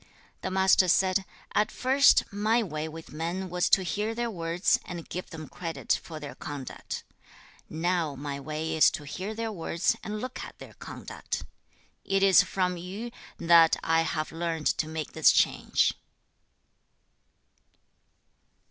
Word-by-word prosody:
2. -, -, -27 dB, 0.3 s
The -, -, -3 dB
Master 190 Hz, 0 st, +4 dB
said, 190 Hz, +2 st, +3 dB, 0.3 s
'At 210 Hz, -, +2 dB
first, 270 Hz, +2 st, +5 dB
my 220 Hz, +3 st, +2 dB
way 155 Hz, -5 st, -4 dB
with 160 Hz, 0 st, -10 dB
men 175 Hz, +4 st, -3 dB
was 180 Hz, 0 st, +1 dB
to 190 Hz, -, +5 dB
hear 210 Hz, +6 st, -2 dB
their 235 Hz, 0 st, -2 dB
words, 170 Hz, 0 st, +1 dB
and 175 Hz, -2 st, -7 dB
give 180 Hz, -, -6 dB
them 160 Hz, -3 st, -8 dB
credit 165 Hz, -2 st, -2 dB
for 160 Hz, -2 st, -8 dB
their 145 Hz, -2 st, -7 dB
conduct. 145 Hz, -3 st, -7 dB, 0.7 s
Now 165 Hz, -2 st, -1 dB
my 140 Hz, 0 st, -5 dB
way 155 Hz, +3 st, -3 dB
is 155 Hz, -, +7 dB
to 145 Hz, -, -11 dB
hear 190 Hz, +8 st, -5 dB
their 225 Hz, 0 st, -3 dB
words, 170 Hz, -3 st, 0 dB
and 210 Hz, 0 st, -4 dB
look 255 Hz, +3 st, -5 dB
at -, -, -10 dB
their -, -, -12 dB
conduct. -, -, -6 dB, 0.6 s
It 195 Hz, 0 st, +1 dB
is 195 Hz, 0 st, +7 dB
from 180 Hz, -1 st, -1 dB
Yu 195 Hz, +7 st, -6 dB, 0.3 s
that 165 Hz, -1 st, +6 dB
I 165 Hz, 0 st, +3 dB
have 155 Hz, -1 st, -2 dB
learned 165 Hz, -1 st, -3 dB
to 155 Hz, -, 0 dB
make 160 Hz, -1 st, -5 dB
this -, -, +6 dB
change.' -, -, +2 dB
175 Hz, 150 wpm, -28 LUFS, 160-195 Hz, 0.7 s, is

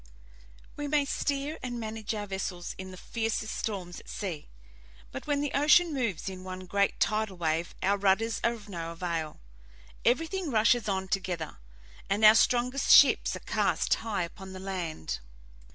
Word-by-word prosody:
We 290 Hz, 0 st, -3 dB
may 290 Hz, -1 st, +2 dB
steer 280 Hz, +2 st, -2 dB
and 245 Hz, -2 st, -4 dB
manage 220 Hz, -1 st, -4 dB
our 205 Hz, -1 st, -3 dB
vessels 190 Hz, -3 st, -4 dB
in 190 Hz, 0 st, -6 dB
the 185 Hz, -, -10 dB
fiercest 225 Hz, +1 st, -2 dB
storms 185 Hz, -5 st, -4 dB
at -, -, -15 dB
sea, 175 Hz, -8 st, -5 dB, 0.6 s
but -, -, -7 dB
when 290 Hz, -1 st, +1 dB
the 290 Hz, -, -1 dB
ocean 305 Hz, +3 st, +5 dB
moves 230 Hz, -, -2 dB
in 185 Hz, -1 st, -6 dB
one 185 Hz, 0 st, -7 dB
great 200 Hz, +2 st, +1 dB
tidal 215 Hz, -3 st, 0 dB
wave 165 Hz, 0 st, -1 dB
our 200 Hz, +1 st, +2 dB
rudders 205 Hz, +4 st, +2 dB
are 235 Hz, -, +3 dB
of 215 Hz, -3 st, -11 dB
no 165 Hz, -4 st, -5 dB
avail. 165 Hz, -3 st, -4 dB, 0.6 s
Everything 325 Hz, +8 st, +1 dB
rushes 225 Hz, -2 st, +3 dB
on 190 Hz, -1 st, -1 dB
together, 185 Hz, -, -3 dB, 0.5 s
and 205 Hz, +2 st, +3 dB
our 215 Hz, -, +10 dB
strongest 250 Hz, +4 st, +2 dB
ships 285 Hz, -, +7 dB
are -, -, -8 dB
cast -, -, +1 dB
high 215 Hz, -5 st, -1 dB
upon 190 Hz, +2 st, -8 dB
the 185 Hz, -, -7 dB
land. 180 Hz, -, -4 dB
205 Hz, 165 wpm, -29 LUFS, 185-240 Hz, 0.6 s, our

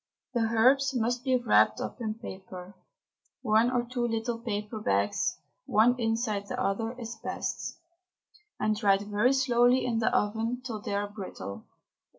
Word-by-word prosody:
The 240 Hz, -, +1 dB
herbs 265 Hz, +4 st, +4 dB
must 245 Hz, +1 st, 0 dB
be 260 Hz, -2 st, +2 dB
wrapped 245 Hz, -1 st, +3 dB
up -, -, -5 dB
in 215 Hz, -2 st, -2 dB
paper 190 Hz, -3 st, -9 dB, 0.7 s
(one 220 Hz, +3 st, +4 dB
or 245 Hz, -1 st, +1 dB
two 240 Hz, 0 st, -2 dB
little 230 Hz, +1 st, -2 dB
paper 215 Hz, -1 st, -4 dB
bags, 100 Hz, -, 0 dB, 0.3 s
one 230 Hz, +4 st, +4 dB
inside 225 Hz, -3 st, -1 dB
the 250 Hz, +2 st, -4 dB
other, 225 Hz, 0 st, -1 dB
is 230 Hz, -1 st, -6 dB
best), -, -, -4 dB, 0.8 s
and 215 Hz, 0 st, +1 dB
dried 200 Hz, -2 st, +3 dB
very 210 Hz, +4 st, +2 dB
slowly 250 Hz, -1 st, +3 dB
in 235 Hz, -2 st, 0 dB
the 225 Hz, -, +2 dB
oven 225 Hz, +4 st, 0 dB
till 220 Hz, -4 st, -4 dB
they 200 Hz, -, -3 dB
are 205 Hz, 0 st, -1 dB
brittle. 190 Hz, -, -8 dB
225 Hz, 155 wpm, -29 LUFS, 210-245 Hz, 0.8 s, herbs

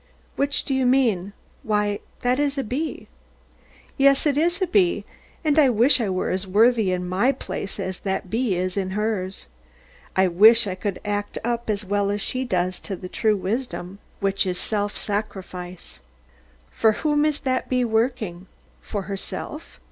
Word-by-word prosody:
Which 280 Hz, 0 st, +1 dB
do 275 Hz, -, -1 dB
you 265 Hz, -1 st, +2 dB
mean? 225 Hz, -8 st, +2 dB, 0.3 s
Why, 210 Hz, -1 st, 0 dB, 0.2 s
that 250 Hz, +2 st, +2 dB
is 290 Hz, -1 st, 0 dB
a 270 Hz, -, 0 dB
bee. 280 Hz, +8 st, -4 dB, 0.9 s
Yes, 275 Hz, +1 st, +5 dB
it 290 Hz, -2 st, +2 dB
is 340 Hz, +4 st, +1 dB
a 375 Hz, -, +2 dB
bee: 360 Hz, 0 st, +2 dB, 0.4 s
and 305 Hz, 0 st, +4 dB
I 280 Hz, -3 st, +6 dB
wish 245 Hz, +3 st, +4 dB
I 215 Hz, -, 0 dB
were 185 Hz, -1 st, -1 dB
as 190 Hz, +1 st, -1 dB
worthy 220 Hz, +1 st, +4 dB
in 180 Hz, 0 st, -2 dB
my 195 Hz, +9 st, +2 dB
place 205 Hz, -6 st, -6 dB
as 185 Hz, -1 st, -4 dB
that 190 Hz, -1 st, -2 dB
bee 225 Hz, 0 st, 0 dB
is 180 Hz, +1 st, -2 dB
in 190 Hz, 0 st, -2 dB
hers. 205 Hz, -3 st, -2 dB, 0.7 s
I 190 Hz, 0 st, +4 dB
wish 215 Hz, +7 st, +7 dB
I 195 Hz, -, -2 dB
could 190 Hz, +1 st, -4 dB
act 205 Hz, 0 st, -2 dB
up 235 Hz, 0 st, -2 dB
as 210 Hz, -1 st, -1 dB
well 200 Hz, +1 st, 0 dB
as 205 Hz, +1 st, -1 dB
she 255 Hz, +5 st, -1 dB
does 185 Hz, -6 st, -1 dB
to 200 Hz, -, -5 dB
the 180 Hz, 0 st, -8 dB
true 215 Hz, +1 st, +1 dB
wisdom, 200 Hz, -2 st, -4 dB, 0.2 s
which 195 Hz, 0 st, +1 dB
is 180 Hz, -1 st, -1 dB
self 205 Hz, +1 st, -2 dB
sacrifice. 185 Hz, -4 st, -5 dB, 0.7 s
For 220 Hz, -1 st, +3 dB
whom 295 Hz, +5 st, +1 dB
is 300 Hz, -1 st, 0 dB
that 255 Hz, -2 st, -1 dB
bee 250 Hz, -1 st, +2 dB
working? 220 Hz, -6 st, -1 dB, 0.3 s
For 205 Hz, -3 st, -4 dB
herself? 200 Hz, -, -6 dB
210 Hz, 170 wpm, -23 LUFS, 190-255 Hz, 0.9 s, wish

